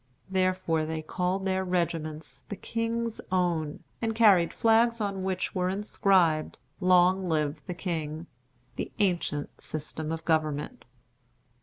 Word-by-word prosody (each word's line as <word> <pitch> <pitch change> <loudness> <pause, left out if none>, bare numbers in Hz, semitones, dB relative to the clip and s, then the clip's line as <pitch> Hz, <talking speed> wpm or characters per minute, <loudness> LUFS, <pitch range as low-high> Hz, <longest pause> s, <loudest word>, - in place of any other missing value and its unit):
Therefore 185 -4 +1
they 160 0 -3
called 180 +4 -1
their 190 0 +1
regiments 155 -5 -2
"The 205 - -3
King's 230 +1 -2
Own," 170 -5 0 0.2
and 225 -1 -1
carried 200 -7 +5
flags 230 +1 +3
on 200 -2 -2
which 185 -1 -2
were 180 0 0
inscribed, 185 -5 +2 0.2
"Long 185 0 +4
live 150 -1 0
the 180 - -4
King," 160 -3 -3 0.5
"The - - -3
Ancient 175 -7 -1
System 155 0 -5
of 165 0 -4
Government." 155 -2 -1
180 Hz, 125 wpm, -28 LUFS, 160-195 Hz, 0.5 s, carried